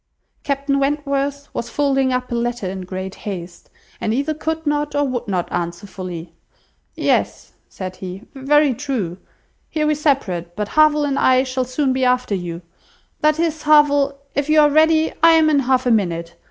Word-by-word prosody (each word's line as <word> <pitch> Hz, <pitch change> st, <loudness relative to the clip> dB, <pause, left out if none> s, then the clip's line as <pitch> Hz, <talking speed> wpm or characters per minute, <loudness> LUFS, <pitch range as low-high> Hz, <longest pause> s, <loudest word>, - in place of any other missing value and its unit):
Captain 280 Hz, 0 st, -1 dB
Wentworth 280 Hz, 0 st, -1 dB
was 235 Hz, -, -4 dB
folding 270 Hz, -2 st, +1 dB
up 250 Hz, 0 st, -2 dB
a -, -, -1 dB
letter 240 Hz, -3 st, -2 dB
in 190 Hz, +1 st, -5 dB
great 185 Hz, +1 st, -6 dB
haste, 175 Hz, -4 st, -8 dB, 0.3 s
and 220 Hz, -, -1 dB
either 285 Hz, +4 st, 0 dB
could 320 Hz, +1 st, -3 dB
not 295 Hz, 0 st, -1 dB
or 290 Hz, 0 st, +2 dB
would 250 Hz, -3 st, -3 dB
not 185 Hz, -3 st, -1 dB
answer 170 Hz, +2 st, -3 dB
fully. 180 Hz, -4 st, -7 dB, 0.6 s
"Yes," -, -, -1 dB, 0.2 s
said 185 Hz, -1 st, -7 dB
he, 185 Hz, +2 st, -7 dB
"very 285 Hz, +1 st, +3 dB
true; 230 Hz, -10 st, -3 dB, 0.5 s
here 305 Hz, -1 st, -1 dB
we 305 Hz, -, +3 dB
separate, 205 Hz, -, -1 dB
but 210 Hz, 0 st, -3 dB
Harville 305 Hz, -1 st, +4 dB
and 280 Hz, -1 st, -1 dB
I 255 Hz, 0 st, +4 dB
shall 255 Hz, -1 st, -2 dB
soon 260 Hz, +1 st, 0 dB
be 260 Hz, 0 st, -1 dB
after 250 Hz, -3 st, +1 dB
you; 175 Hz, -2 st, -4 dB, 0.6 s
that 305 Hz, 0 st, +2 dB
is, 325 Hz, -2 st, 0 dB
Harville, 285 Hz, -2 st, +4 dB, 0.2 s
if 285 Hz, +1 st, -1 dB
you 310 Hz, 0 st, +5 dB
are 295 Hz, -1 st, +4 dB
ready, 315 Hz, +1 st, +3 dB
I 330 Hz, 0 st, +7 dB
am 315 Hz, -1 st, +4 dB
in 290 Hz, -, +4 dB
half 260 Hz, -1 st, +1 dB
a 245 Hz, -, +3 dB
minute. 170 Hz, -6 st, 0 dB
265 Hz, 180 wpm, -20 LUFS, 195-295 Hz, 0.6 s, I